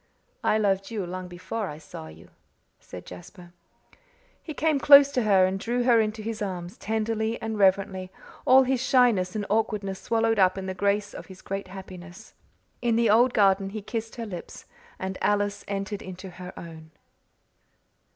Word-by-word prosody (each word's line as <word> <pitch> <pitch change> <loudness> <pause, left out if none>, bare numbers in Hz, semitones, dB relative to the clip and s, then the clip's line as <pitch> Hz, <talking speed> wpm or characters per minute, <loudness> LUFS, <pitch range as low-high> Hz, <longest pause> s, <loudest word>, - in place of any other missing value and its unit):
"I 215 - +3
loved 195 -2 0
you 215 -5 -3
long 185 +1 -6
before 185 +4 -5
I 150 - -7
saw 145 - -10
you," 80 +1 -14 0.5
said 90 - -11
Jasper. 175 0 -12 0.9
He 320 - -8
came 310 -2 +1
close 280 0 +8
to 255 - 0
her 195 -4 +4
and 190 +1 -2
drew 240 +4 -1
her 240 -2 +5
into 215 0 -3
his 220 0 -5
arms, 180 -3 -4
tenderly 220 +1 -2
and 225 -1 -4
reverently, 190 -1 +2 0.3
all 265 +1 +6
his 260 -1 0
shyness 240 -9 +3
and 210 -1 -2
awkwardness 205 -3 -1
swallowed 225 -1 +1
up 185 0 +4
in 190 - -4
the 190 - -3
grace 200 +2 0
of - - -9
his 185 -1 -13
great 195 0 -4
happiness. 185 -1 -11 0.5
In 235 -2 +1
the 230 -2 +3
old 240 +3 +4
garden 195 -2 +3
he 210 +1 -7
kissed 225 0 -5
her 235 - -5
lips 185 -5 -9 0.3
and 190 0 -5
Alice 205 0 0
entered 200 0 -4
into 185 0 -9
her 180 0 -9
own. 160 -2 -10
200 Hz, 170 wpm, -26 LUFS, 185-225 Hz, 0.9 s, close